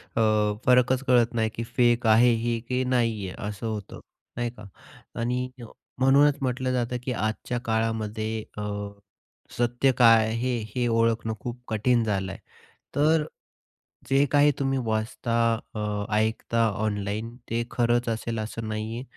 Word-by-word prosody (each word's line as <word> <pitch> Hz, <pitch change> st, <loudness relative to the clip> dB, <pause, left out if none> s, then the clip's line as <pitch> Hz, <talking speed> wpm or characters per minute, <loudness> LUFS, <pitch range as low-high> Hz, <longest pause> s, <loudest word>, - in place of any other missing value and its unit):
अ, 115 Hz, -, +2 dB, 0.4 s
फरकच 125 Hz, +1 st, +4 dB
कळत 120 Hz, -1 st, +4 dB
नाही 110 Hz, -1 st, +1 dB
की 115 Hz, -, -3 dB
फेक 120 Hz, 0 st, +2 dB
आहे 115 Hz, +3 st, +6 dB
ही 120 Hz, -1 st, 0 dB
की 130 Hz, 0 st, +1 dB
नाही 115 Hz, -5 st, 0 dB
आहे? -, -, -9 dB
असं 105 Hz, +2 st, -5 dB
होतं, 105 Hz, -3 st, -5 dB, 0.4 s
नाही 120 Hz, 0 st, -1 dB
का. 105 Hz, -3 st, -13 dB, 0.5 s
आणि 125 Hz, +2 st, -1 dB, 0.5 s
म्हणूनच 140 Hz, +2 st, +5 dB
म्हटलं 130 Hz, 0 st, -1 dB
जातं 125 Hz, 0 st, -1 dB
की 125 Hz, -, -2 dB
आजच्या 110 Hz, +2 st, -2 dB
काळामध्ये 110 Hz, -1 st, -1 dB
अ, -, -, -3 dB, 1.0 s
सत्य 120 Hz, +3 st, +2 dB
काय 115 Hz, -2 st, +6 dB
आहे 110 Hz, -, -2 dB
हे, 125 Hz, 0 st, -1 dB, 0.2 s
हे 125 Hz, -1 st, +1 dB
ओळखणं 115 Hz, -1 st, +1 dB
खूप 120 Hz, +2 st, -6 dB
कठीण 115 Hz, +2 st, +2 dB
झालं 95 Hz, -3 st, -1 dB
आहे. -, -, -9 dB, 0.6 s
तर 150 Hz, +2 st, +3 dB, 0.8 s
जे 135 Hz, +1 st, +4 dB
काही 145 Hz, 0 st, +5 dB
तुम्ही 135 Hz, -1 st, 0 dB
वाचता 110 Hz, +1 st, -2 dB, 0.4 s
अ, 105 Hz, -1 st, -2 dB
ऐकता 110 Hz, +1 st, +1 dB, 0.2 s
ऑनलाईन 105 Hz, +2 st, -3 dB
ते 115 Hz, +1 st, 0 dB
खरंच 120 Hz, 0 st, +1 dB
असेल 115 Hz, 0 st, -2 dB
असं 110 Hz, +1 st, -5 dB
नाहीये 110 Hz, +2 st, -4 dB
115 Hz, 145 wpm, -26 LUFS, 110-125 Hz, 1.0 s, आहे